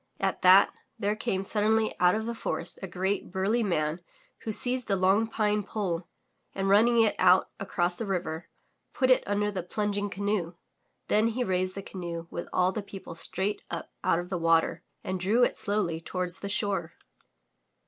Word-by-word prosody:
At - - -1
that, 185 +2 +7 0.2
there 210 -1 0
came 205 -4 -2
suddenly 220 +2 +2
out 180 +1 +5
of 220 0 -2
the 235 - -2
forest 230 - -4
a 190 - -4
great, 190 +3 -2
burly 195 +5 0
man 165 -5 0 0.4
who 220 - -4
seized 250 +2 -1
a 200 - +3
long 195 +4 +3
pine 210 -2 0
pole 185 -5 -3 0.5
and 195 0 -1
running 225 +4 +5
it 215 - +1
out 185 0 +5
across 175 -2 0
the 225 - -4
river, 170 -3 -3 0.4
put 255 -1 +2
it 255 - +5
under 205 +1 0
the 190 -2 -3
plunging 205 +2 -2
canoe. 200 -3 -2 0.5
Then 215 +2 +3
he 240 +2 -1
raised 185 -3 -1
the 200 - -5
canoe 170 -4 -6
with 170 - -5
all 180 0 +2
the 210 - -3
people 195 -3 -9
straight 190 +4 -2
up 170 - -6
out - - +3
of 175 +1 -4
the 185 -2 -2
water 165 -1 +2 0.2
and 185 0 -3
drew 210 +7 +3
it - - +2
slowly 195 -6 0
toward 180 +1 -3
the 200 +3 -1
shore. 200 -5 -1
195 Hz, 180 wpm, -28 LUFS, 180-210 Hz, 0.5 s, that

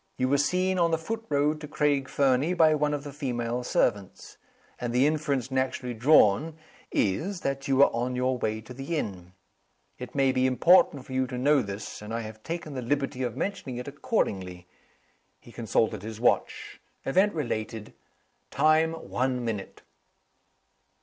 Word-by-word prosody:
You 130 - 0
were 140 +1 +3
seen 185 +5 +1
on 170 -1 +3
the 165 - +1
foot 225 +8 -5
road 150 +1 +1
to 150 - -6
Craig 145 -2 0
Fernie 140 +5 +2
by 160 -3 +5
one 150 -1 +1
of 145 - -6
the 145 -1 -8
female 125 -4 -3
servants. 100 -5 -1 0.4
And 120 -1 -3
the 125 +3 +4
inference 145 -4 0
naturally 130 -1 -1
drawn 135 +4 +4 0.3
is, 170 - -1
that 135 0 -3
you 135 - +2
were 140 +1 +5
on 125 +2 -1
your 125 0 0
way 110 -1 -2
to 110 +3 -11
the 135 +6 -4
inn. 90 -8 -5 0.7
It 125 +1 -8
may 135 -1 +3
be 130 0 +2
important 140 0 +4
for 130 - -9
you 130 0 +1
to 125 - -5
know 140 +2 +3
this; 100 -1 -7
and 105 +2 -5
I 115 - -2
have 110 -1 -9
taken 165 0 -5
the 130 - -4
liberty 135 +1 -1
of 120 -3 -3
mentioning 190 -11 -3
it 125 - -6
accordingly." 95 - -2 0.7
He 120 - -16
consulted 115 -2 0
his 110 +1 -7
watch. 120 - 0 0.2
"Event 190 +7 +2
related. 110 -6 -4 0.6
Time, 155 +2 +3
one 125 -5 -2
minute." 105 -4 -5
130 Hz, 170 wpm, -27 LUFS, 120-150 Hz, 0.7 s, by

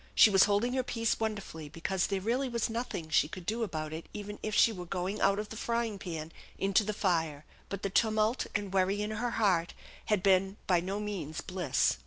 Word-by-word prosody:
She 215 - +8
was 195 -1 +7
holding 210 +5 +1
her 260 - +2
peace 230 -2 -1
wonderfully, 200 -8 -4
because 180 +4 -1
there 195 -1 -1
really 245 +7 0
was 235 -2 -1
nothing 225 -9 -4
she 150 - +4
could 175 +2 -9
do 225 +5 -1
about 155 -7 -3
it 160 +1 -6
even 205 0 -6
if 215 0 -2
she 230 - +6
was 180 -5 -7
going 185 +4 -2
out 195 0 +4
of 210 0 -4
the 225 - -7
frying 230 -2 -1
pan 165 -4 -5 0.3
into 195 +2 +3
the 215 - -1
fire; 165 -7 0 0.2
but 200 -1 -5
the 195 - 0
tumult 220 +2 +2
and 205 -2 -2
worry 195 +2 +2
in 210 - -3
her 230 +3 -1
heart 180 -6 +2 0.3
had 210 -4 +1
been 195 0 +3
by 180 -2 +3
no 190 +4 -3
means 195 -7 -4
bliss. 180 -1 +1
200 Hz, 215 wpm, -31 LUFS, 180-215 Hz, 0.3 s, She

